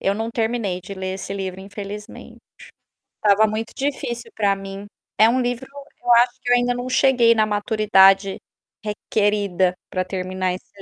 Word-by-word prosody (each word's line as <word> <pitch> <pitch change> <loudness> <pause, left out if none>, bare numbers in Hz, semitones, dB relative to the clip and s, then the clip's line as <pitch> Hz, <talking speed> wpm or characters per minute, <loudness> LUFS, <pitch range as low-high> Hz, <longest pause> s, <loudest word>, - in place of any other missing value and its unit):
Eu 195 - +1
não 225 +2 -3
terminei 225 -5 -1
de 200 +2 -9
ler 190 0 -4
esse 190 0 -6
livro, 190 -1 -5
infelizmente. 205 +1 -9 0.9
Estava 210 +1 +4
muito 220 +1 -4
difícil 245 -4 -3
para 200 -2 +2
mim. 195 +1 -8 0.3
É 220 - +7
um 255 +2 +1
livro 245 +1 -2
que 280 -1 -15
eu 240 - +5
acho 240 +1 +4
que - - -4
eu - - +7
ainda 245 0 +1
não 245 +1 -5
cheguei 250 -3 +4
na 215 -1 +3
maturidade 205 -2 +3 0.5
requerida 205 -3 0 0.2
para 185 0 -1
terminar 185 0 -2
esse 195 +2 -12
210 Hz, 165 wpm, -21 LUFS, 195-235 Hz, 0.9 s, É